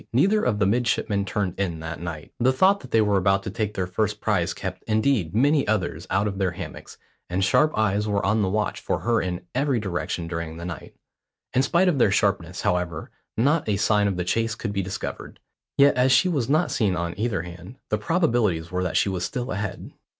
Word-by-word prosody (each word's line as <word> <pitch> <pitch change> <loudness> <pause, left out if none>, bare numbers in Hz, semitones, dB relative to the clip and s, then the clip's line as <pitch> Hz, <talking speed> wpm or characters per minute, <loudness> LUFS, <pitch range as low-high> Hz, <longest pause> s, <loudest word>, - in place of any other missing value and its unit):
Neither 195 - +3
of 110 -4 +1
the 105 - +2
midshipmen 105 -2 +1
turned 95 -1 -2
in 85 -5 -1
that 80 -1 -6
night. 80 -3 -7
The 125 +2 +4
thought 190 +9 +4
that - - -12
they 115 - +4
were 105 -2 +2
about 95 +1 +2
to 105 - -4
take 105 0 -3
their 90 - -1
first 90 - -1
prize - - 0
kept, - - -5
indeed, 110 -5 +1
many 140 +4 +3
others 90 -6 -1
out 100 +3 +1
of 100 -1 -4
their 95 -2 +2
hammocks, 90 -3 -9 0.3
and 90 +2 0
sharp 150 +9 +3
eyes 105 -1 +1
were 100 -1 0
on 110 0 +2
the 95 - +1
watch 105 +1 -1
for - - -2
her 115 -1 +2
in 90 -1 -3
every 135 -1 +1
direction 85 -3 -3
during 80 -1 -5
the 85 - -7
night. 85 -5 -7 0.6
In 130 - +4
spite 170 +7 +2
of 160 -7 +2
their 110 - +5
sharpness, 100 -2 0
however, 90 -3 -1 0.3
not 145 +3 +2
a 100 - +1
sign 105 0 +2
of 95 -2 -1
the 90 - -1
chase 115 +4 0
could 110 -4 -4
be 100 - 0
discovered. 95 +1 -6 0.4
Yet 140 +1 +6
as 130 +1 +3
she 130 +8 +5
was 140 -9 0
not 155 +3 +2
seen 100 -5 +1
on 85 -1 -2
either 105 -5 -1
hand, 90 +7 -10
the 105 - 0
probabilities 110 - +1
were 90 0 -1
that 90 - 0
she - - +2
was 90 -2 -2
still 125 +6 -3
ahead. 100 +1 -4
105 Hz, 220 wpm, -24 LUFS, 90-120 Hz, 0.6 s, Yet